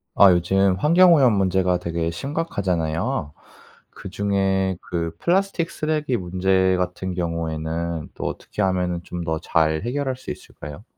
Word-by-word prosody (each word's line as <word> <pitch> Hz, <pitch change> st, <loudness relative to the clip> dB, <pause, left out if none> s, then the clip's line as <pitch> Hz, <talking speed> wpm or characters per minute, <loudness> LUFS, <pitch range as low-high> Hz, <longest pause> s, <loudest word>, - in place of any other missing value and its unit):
아 100 Hz, -1 st, +8 dB
요즘 95 Hz, +2 st, +2 dB
환경오염 165 Hz, -5 st, +6 dB
문제가 95 Hz, -2 st, +2 dB
되게 85 Hz, -1 st, -2 dB
심각하잖아요? 90 Hz, -, -2 dB, 0.6 s
그중에 95 Hz, -1 st, -1 dB
그 85 Hz, -1 st, -3 dB
플라스틱 180 Hz, -1 st, +1 dB
쓰레기 155 Hz, -4 st, -1 dB
문제 95 Hz, 0 st, +1 dB
같은 90 Hz, +1 st, -3 dB
경우에는 85 Hz, -1 st, -3 dB
또 -, -, -5 dB
어떻게 -, -, -4 dB
하면은 90 Hz, -2 st, 0 dB
좀 90 Hz, -1 st, -6 dB
더 80 Hz, -1 st, -2 dB
잘 80 Hz, +1 st, +1 dB
해결할 130 Hz, +2 st, -2 dB
수 130 Hz, -, -7 dB
있을까요? 75 Hz, +6 st, -10 dB
95 Hz, 300 characters per minute, -22 LUFS, 85-105 Hz, 0.6 s, 아